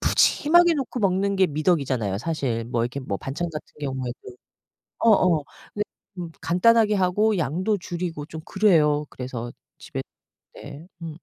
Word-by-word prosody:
푸짐하게 345 +2 +4
놓고 260 -3 -3
먹는 195 0 +1
게 190 -1 +4
미덕이잖아요 140 - 0
사실. 125 -5 -2
뭐 120 -1 -1
이렇게 125 +4 -3
뭐 100 -7 -3
반찬 160 +6 -4
같은 155 -1 -8
경우에도 130 -3 -4 0.8
어 230 - +5
어 180 -7 +4 0.3
근데 210 - -1 0.3
좀 175 -3 -6
간단하게 215 +5 +4
하고 205 +3 +2
양도 185 +7 0
줄이고 170 -4 -5
좀 160 0 -8
그래요. 155 -8 +3
그래서 125 -2 -6 0.3
집에 - - -6 0.5
네 150 +4 -10 0.2
음. 165 -1 -5
165 Hz, 305 characters per minute, -24 LUFS, 140-195 Hz, 0.8 s, 어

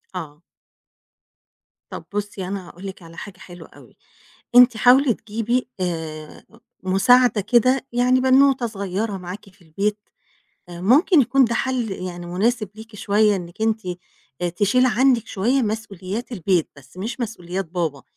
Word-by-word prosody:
آه. 155 -3 -7 1.5
طَب - - -8
بُصّي، 205 -2 -4
أنا 190 -2 -5
هاقول 180 +3 -12
لِك 190 -1 -9
على 165 -1 -14
حاجة 200 -3 -9
حلوة 175 -2 -12
أوي - - -19 0.6
أنتِ 245 -2 +7
حاولي 250 +2 +5
تجيبي، 230 +4 -2
آآ، 160 -4 -5 0.4
مساعدة 210 +5 +4
كده، 255 +5 +2
يعني 250 +1 +3
بنوتة 265 -1 +4
صغيّرة 200 0 -3
معاكِ 185 +2 -9
في 195 0 -23
البيت 200 +6 -2 0.7
آآ، 175 -1 -9
ممكن 290 - +4
يكون 265 +2 +3
ده 235 0 -1
حَل، 250 -3 -1
يعني 180 -2 -6
مناسب 215 +5 0
ليكِ 220 0 -12
شوية 205 0 +2
أنِك 175 +3 -8
أنتِ، 220 0 +1 0.6
آآ، 175 - 0
تشيلي 205 +8 +2
عنِك 250 0 +2
شوية 240 +7 0
مسؤوليات 215 0 -4
البيت، 185 -5 0
بس 145 +4 -18
مش 225 +7 -5
مسؤوليات 195 -5 -4
بابا، 160 -5 -3
205 Hz, 140 wpm, -21 LUFS, 180-240 Hz, 1.5 s, أنتِ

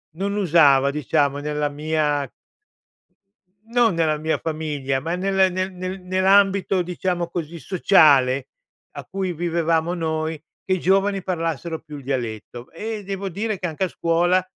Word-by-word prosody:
non 200 +3 -2
usava, 150 -8 +4
diciamo, 140 0 0
nella 150 0 -2
mia 150 -2 -1 1.4
non 235 -3 +3
nella 160 -2 +1
mia 155 +1 -1
famiglia 150 -4 -2
ma 165 +4 -2
nel 190 0 +2
nel 185 +1 -2
nel 185 +1 -5
nell’ambito, 190 +1 +3
diciamo 180 0 -2
così, 170 -1 -5
sociale 145 -8 +4 0.4
a - - -8
cui 190 -2 -3
vivevamo 165 0 0
noi, 160 -2 -2 0.2
che 190 - 0
i 185 - 0
giovani 195 +2 +2
parlassero 165 -2 -3
più 150 -2 -10
il 140 - -11
dialetto, 120 -2 -5
ehm, 215 +4 -5
devo 195 0 -4
dire 205 +2 -3
che 180 - -2
anche 160 +2 -3
a - - -2
scuola 175 +3 +1
170 Hz, 145 wpm, -22 LUFS, 150-185 Hz, 1.4 s, usava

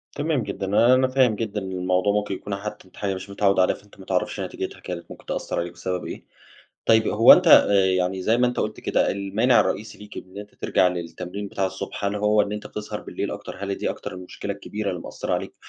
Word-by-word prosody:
تمام 145 -5 0
جدًا، 100 +1 -2
آآ، 125 +2 +6
أنا 130 0 +3
فاهم 130 -4 +3
جدًا 105 -2 -3
إن 95 0 -5
الموضوع 90 +2 +1
ممكن 105 -2 -1
يكون 100 +1 -5
حتّى 105 0 -7
أنت - - -21
حاجة 100 - -2
أنت 95 - -1
مش 95 +2 -8
متعوّد 100 -1 +2
عليها 90 - +3
فأنت 100 -1 -19
ما 95 - -11
تعرفش 90 -1 -1
نتيجتها - - -5
كانت 85 -1 -7
ممكن - - -12
تأثر - - -3
عليك 85 0 -4
بسبب 90 0 -4
إيه. - - -7 0.6
طيّب 110 -1 +5
هو 115 +3 +8
أنت 180 -1 +5
آآ، 100 -10 +7
يعني 95 0 0
زي 115 +5 +2
ما 125 - +4
أنت 125 - -1
قلت - - -3
كده - - +1
المانع 100 +5 +2
الرئيسي 110 - -2
ليك 105 0 -12
إن 95 +2 -9
أنت 105 0 -10
ترجع 90 - +2
للتمرين 90 +3 -5
بتاع 95 -1 -1
الصبح، 95 +2 -6
هل 100 +1 0
هو 105 0 +3
إن 105 +1 -3
أنت 105 - -5
بتسهر 105 0 -6
بالليل - - -4
أكتر؟ - - -7
هل 100 - -3
هي 100 - 0
دي - - -2
أكتر - - -6
المشكلة 90 0 -6
الكبيرة 105 -1 -4
اللي 90 - -5
مأثرة - - -3
عليك - - -4
100 Hz, 235 wpm, -24 LUFS, 95-105 Hz, 0.6 s, هو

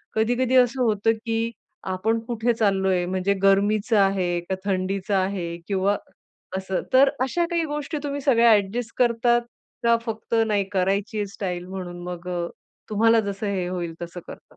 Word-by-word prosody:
कधी-कधी 245 +3 +1
असं 250 +1 +4
होतं 220 0 +2
की 225 0 -1 0.4
आपण 220 +5 0
कुठे 235 0 0
चाललोय 190 -4 +1
म्हणजे 190 +2 0
गरमीचं 205 +3 +3
आहे 185 -3 +2
का 190 - +1
थंडीचं 195 +1 -1
आहे 185 -3 -1
किंवा 200 0 +1 0.6
असं, 190 -1 -2
तर 270 +1 +7
अशा 340 +7 +1
काही 335 -1 +1
गोष्टी 295 +1 -4
तुम्ही 285 0 -3
सगळ्या 235 -4 +5
ॲडजस्ट 215 +3 0
करतात 240 0 +3 0.4
का 235 0 +4
फक्त 225 +1 -3
नाही 205 -2 +2
करायची 195 +3 0
आहे 205 - 0
स्टाईल 180 -3 -4
म्हणून 180 -2 -6
मग 180 0 -7
अ, 175 -1 -2 0.4
तुम्हाला 225 +2 +4
जसं 200 0 -3
हे 185 -3 -1
होईल 175 -2 -3
तसं 175 +1 -6
करतात? - - -10
205 Hz, 155 wpm, -24 LUFS, 190-230 Hz, 0.6 s, तर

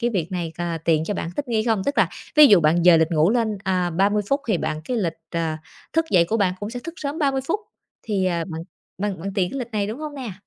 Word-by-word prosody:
cái 240 0 +1
việc 180 -4 -2
này, 170 -3 -3
ờ, 170 -1 -2
tiện 160 -1 +2
cho 205 - -2
bạn 170 - -4
thích 280 -3 -3
nghi 220 -2 +1
không? 225 -5 +1
Tức 285 - -1
là - - +4 0.3
ví 300 -1 +10
dụ 200 -8 +6
bạn 165 +3 +3
dời 170 -2 +7
lịch 160 +1 +2
ngủ 160 +4 +3
lên, 225 -4 0
à, 185 -2 0
30 200 +4 +2
phút 275 - +2
thì 190 -6 +2
bạn 155 - -3
cái 250 - -2
lịch, 170 -7 -1 0.2
ờ, 160 -2 -1 0.4
thức 325 0 +2
dậy 175 -3 +5
của 220 +6 -1
bạn 185 -4 +1
cũng 205 +2 -4
sẽ 245 +1 -6
thức 335 0 -6
sớm 290 +2 -4
30 275 -3 +1
phút. 420 +5 0 0.4
Thì, 200 -4 -1
à, 170 -2 0
bạn 165 -3 -6 0.4
bạn 195 -3 -2
bạn 195 +2 -4
tiện 185 -3 +1
cái 275 - -4
lịch 240 -1 -5
này, 205 -2 0
đúng 220 +6 -5
hông 305 -1 -6
nè? 255 -8 -5
200 Hz, 280 wpm, -23 LUFS, 170-240 Hz, 0.4 s, ví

